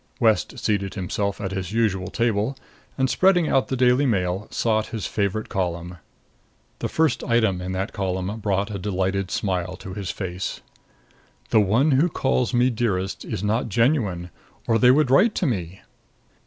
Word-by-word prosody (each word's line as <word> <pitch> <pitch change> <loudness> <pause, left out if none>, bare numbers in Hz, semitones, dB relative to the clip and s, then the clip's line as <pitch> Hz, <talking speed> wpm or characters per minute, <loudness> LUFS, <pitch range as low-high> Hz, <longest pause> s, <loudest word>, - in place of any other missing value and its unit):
West 110 -3 +2
seated 100 -3 -1
himself 100 +1 -2
at 95 -2 -3
his 95 -1 -4
usual 100 -5 +1
table 115 +2 0 0.4
and, 130 -1 +2
spreading 180 +2 +3
out 135 - +2
the 130 - -2
Daily 125 +3 +4
Mail, 95 -2 0
sought 110 -2 0
his 110 -4 -5
favorite 105 +1 -1
column. 90 -1 -3 0.8
The - - -2
first 160 -1 +1
item 110 -6 +1
in 90 +1 -4
that 95 +3 -3
column 95 +1 -2
brought 100 0 -1
a 100 - -4
delighted 95 -1 -1
smile 90 -2 -2
to 95 +1 -9
his 100 -2 -5
face: 90 -1 -4 0.9
"The 110 - +5
one 115 +10 +3
who 145 +6 +3
calls 130 -5 0
me 125 +1 +3
Dearest 100 -5 -2
is 95 - -4
not 110 +3 0
genuine 110 - +1 0.3
or 115 -1 +2
they 125 - +6
would 135 0 +4
write 200 - +5
to - - 0
me." 95 - -3
105 Hz, 165 wpm, -23 LUFS, 95-120 Hz, 0.9 s, they